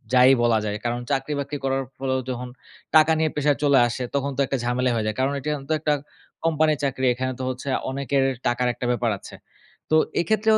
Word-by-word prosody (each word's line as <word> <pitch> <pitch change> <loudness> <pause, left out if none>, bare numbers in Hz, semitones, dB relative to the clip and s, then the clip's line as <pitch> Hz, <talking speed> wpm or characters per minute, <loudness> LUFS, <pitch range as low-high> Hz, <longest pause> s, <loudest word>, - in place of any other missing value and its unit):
যায়ই 130 +1 +7
বলা 115 -2 +3
যায়। 105 0 -2
কারণ 120 0 -1
চাকরি-বাকরি 140 +1 -2
করার 135 0 0
ফলেও 130 -1 -1
যখন 125 0 -4 0.5
টাকা 155 0 +7
নিয়ে 160 0 +2
প্রেশার 145 -1 +2
চলে 140 -2 +5
আসে 120 +2 -4
তখন 140 0 0
তো - - -5
একটা 135 - -1
ঝামেলাই 125 +1 +1
হয়ে 110 -2 -1
যায়। 110 - -2
কারণ 135 +1 +2
এইটা 145 +3 -4
অন 135 - -10
তো - - +2
একটা 150 0 +1 0.5
কোম্পানির 155 -2 +2
চাকরি। 130 -1 0
এখানে 130 +1 -2
তো - - -3
হচ্ছে 130 +2 -6 0.2
অনেকের 135 0 0 0.2
টাকার 120 +1 +1
একটা 125 +1 -5
ব্যাপার 120 -1 0
আছে। - - -12 0.5
তো 155 - +3 0.2
এক্ষেত্রেও 220 +3 +3
135 Hz, 205 wpm, -24 LUFS, 125-145 Hz, 0.5 s, যায়ই